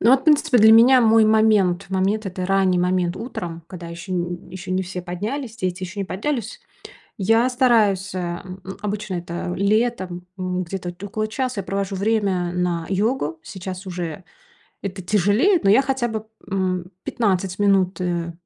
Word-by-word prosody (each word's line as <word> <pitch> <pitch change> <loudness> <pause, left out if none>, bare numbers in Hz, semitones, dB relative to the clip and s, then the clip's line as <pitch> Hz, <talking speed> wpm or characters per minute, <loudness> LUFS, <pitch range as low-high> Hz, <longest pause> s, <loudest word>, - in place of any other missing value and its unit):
Ну 230 - +5
вот 265 0 +4
принципе, 300 -4 +4
для 220 +1 +8
меня 250 +3 +7
мой 225 -1 +5
момент 215 -4 +3
момент- 195 +3 0
это 185 -1 -4
ранний 190 -2 +2
момент 180 0 +1
утром, 170 -8 -6
когда 175 -2 -9
ещё 170 +3 -7
н 175 0 -3
ещё 185 0 -8
не 190 0 +1
все 180 -1 -6
поднялись, 220 +7 -4
дети 185 -1 -3
ещё 190 +3 -6
не 195 - -1
поднялись. 220 +4 -3 0.6
Я 225 +5 +3
стараюсь, 220 -7 +2
а, 175 -1 -3
м, 185 0 -9 0.2
обычно 210 -1 -3
это 175 +1 -4
летом, 200 -3 0
м, 185 0 -2
где-то 175 0 -5
около 215 +2 -3
час 255 +1 -2
я - - -1
провожу 195 +1 -3
время 195 -4 0
на 175 -2 -1
йогу. 195 - 0
Сейчас 190 0 -7
уже 175 -1 -5 0.6
это 195 -1 -5
тяжелее, 210 - +3
но 195 - +4
я 260 +6 +6
хотя 265 -3 -1
бы, 220 -1 -4 0.3
м, 185 -2 -1
15 190 -4 -1
минут, 195 -2 +2
э, 170 -1 -2
195 Hz, 165 wpm, -22 LUFS, 180-220 Hz, 0.6 s, для